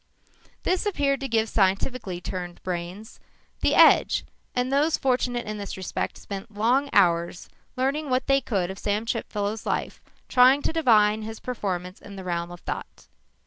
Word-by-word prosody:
This 370 +3 0
appeared 280 -8 +1
to 275 - -3
give 225 -2 +1
scientifically 195 -1 0
trained 180 -1 -6
brains 180 +5 -5 0.4
the - - +2
edge - - +5 0.3
and 250 +1 0
those 300 +3 +3
fortunate 250 -2 0
in 215 0 -5
this 200 -1 -6
respect 185 - -3
spent 200 +1 -8
long 255 +6 +2
hours 170 -2 +2 0.3
learning 280 +3 0
what 255 0 +1
they 275 0 +3
could 190 -7 -1
of 190 - -9
Chipfellow's 210 0 -2
life, - - -2 0.3
trying 260 +3 +5
to - - -1
divine 220 -9 +4
his 220 0 -7
performance 185 -6 -4
in 200 - -11
the 190 - -7
realm 170 -1 -2
of 175 0 -10
thought. - - -6
215 Hz, 155 wpm, -25 LUFS, 190-255 Hz, 0.4 s, edge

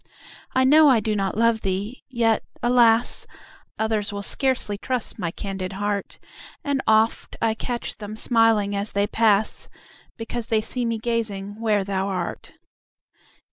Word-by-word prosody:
I 260 - +4
know 300 +3 +7
I 250 -4 +5
do 215 0 -1
not 195 0 -1
love 230 -1 +3
thee! 195 +6 -3
yet, 230 -3 +2 0.2
alas! 240 -1 +3 0.5
Others 220 -2 -1
will 200 0 -5
scarcely 260 -3 0
trust 245 +2 -3
my 175 -3 -1
candid 190 +1 -5
heart; 205 0 -3 0.5
And 280 -2 0
oft 220 +1 +2
I 225 - +2
catch 240 +2 -4
them 210 0 -6
smiling 225 -3 +2
as 200 +1 -3
they 200 0 +2
pass, 215 -1 +1 0.5
Because 230 0 -5
they 220 - +2
see 240 +3 -3
me 230 -1 -1
gazing 215 -3 -2
where 210 -3 +2
thou 190 0 -2
art. 190 -2 -4
220 Hz, 145 wpm, -23 LUFS, 200-230 Hz, 0.5 s, know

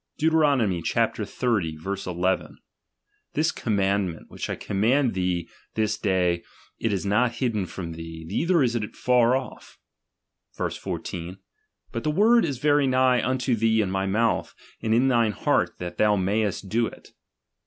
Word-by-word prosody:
Deuteron. 155 -4 +3 0.2
xxx. 100 -3 -1
1 90 -2 -4 0.2
1: - - -14 0.8
This - - +1
commandment, 100 -4 -1
which - - -5
I - - -1
command 120 +6 +1
thee 90 -2 -1 0.3
this 110 -1 +1
day, 90 -4 +1 0.4
it 115 - 0
is 100 -1 -2
not 115 +5 +2
hidden 115 -6 -1
from 85 -2 -6
thee, 80 0 -8
neither 165 - +2
is 120 -1 +1
it 105 -3 -3
Jar 125 0 +3
off, 135 - -6 0.8
Sfc. - - -27
Verse. - - -2
14: 90 +2 -5 0.5
But 115 - -4
the - - 0
word 220 +9 +4
is 135 - -3
very 145 +1 +3
nigh 130 -1 +3
unto 130 -1 +1
thee 110 0 +2
in 100 -4 0
my 95 0 -1
mouth, 115 +4 0 0.3
and 110 - -1
in 125 +3 +3
thine 115 -4 +3
heart, - - 0
that 85 -1 -6
thou 105 -1 +4
mayest 100 +1 -1
do 115 +3 +1
it. - - -12
110 Hz, 155 wpm, -25 LUFS, 95-125 Hz, 0.8 s, word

